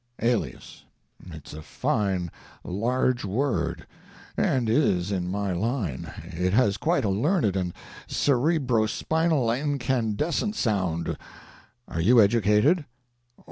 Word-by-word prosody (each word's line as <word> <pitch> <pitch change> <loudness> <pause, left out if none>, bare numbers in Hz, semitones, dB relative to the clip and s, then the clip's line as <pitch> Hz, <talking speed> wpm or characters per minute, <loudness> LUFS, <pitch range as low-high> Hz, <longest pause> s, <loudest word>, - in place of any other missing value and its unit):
"Alias. 115 - -2 0.5
It's 80 -4 -10
a 80 - -8
fine 90 +1 -1 0.3
large 125 +6 0
word, 95 - -1 0.5
and 125 -3 +1
is 105 - +2
in 90 -2 -2
my 100 0 -1
line; 95 - -2
it 90 +3 -2
has 105 -4 +3
quite 160 - +1
a - - +1
learned 110 - +1
and 90 -2 -1 0.4
cerebrospinal 140 0 +1
incandescent 140 - -1
sound. 95 - -1 0.7
Are 80 - -3
you 120 +8 +5
educated?" 110 - +4
110 Hz, 100 wpm, -26 LUFS, 95-130 Hz, 0.7 s, you